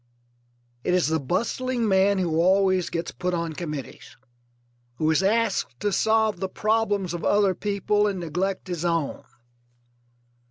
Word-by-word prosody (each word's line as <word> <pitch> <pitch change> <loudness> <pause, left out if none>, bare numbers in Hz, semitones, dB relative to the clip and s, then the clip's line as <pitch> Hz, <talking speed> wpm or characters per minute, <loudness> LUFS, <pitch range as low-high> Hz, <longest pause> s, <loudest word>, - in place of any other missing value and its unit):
It 180 - +1
is 180 -4 +2
the 160 0 +1
bustling 235 - -1
man 195 0 +3
who 170 -4 0
always 185 0 +3
gets 165 0 -3
put 180 0 -2
on 170 -1 -3
committees, 150 -8 -7 0.8
who 155 +4 +1
is 160 - +2
asked 200 - 0
to 205 - 0
solve 220 -1 +2
the 190 0 -2
problems 205 -3 0
of 175 - -5
other 205 -2 +3
people 205 +1 0
and 195 -3 -2
neglect 180 +4 -2
his 175 -2 -4
own. 165 -4 -1
185 Hz, 145 wpm, -25 LUFS, 170-205 Hz, 0.8 s, man